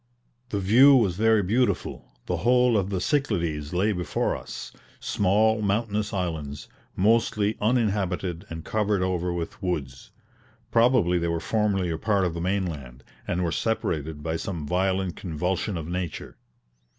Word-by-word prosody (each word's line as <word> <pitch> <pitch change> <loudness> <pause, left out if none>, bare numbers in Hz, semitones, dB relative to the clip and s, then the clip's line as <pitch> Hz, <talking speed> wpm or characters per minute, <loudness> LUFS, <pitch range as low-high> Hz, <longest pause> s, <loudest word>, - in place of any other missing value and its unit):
The 100 - -1
view 125 +9 +7
was 110 -8 +3
very 110 +1 +3
beautiful; 120 +7 -1
the - - -1
whole 125 0 +3
of 100 -2 +1
the 95 -2 -1
Cyclades 85 - -1
lay 95 +5 +1
before 90 -3 -1
us: - - -8 0.3
small, 105 +3 +2
mountainous 105 0 0
islands, 80 -7 -4 0.3
mostly 110 0 +2
uninhabited 100 -6 0
and 80 -1 -7
covered 105 -3 0
over 90 -1 -1
with 85 +2 -5
woods. 70 -9 -4 0.6
Probably 115 -7 +4
they 85 - -1
were 85 0 -1
formerly 100 -2 0
a 80 - -3
part 100 -4 +1
of 85 - -1
the 85 - -4
mainland, 80 -10 -3 0.2
and 90 0 -1
were 85 - 0
separated 80 -8 -2
by 80 +1 -1
some 85 -4 -4
violent 95 +2 0
convulsion 90 +3 -2
of 80 -2 -5
nature. 90 -2 -5
95 Hz, 145 wpm, -25 LUFS, 85-105 Hz, 0.6 s, view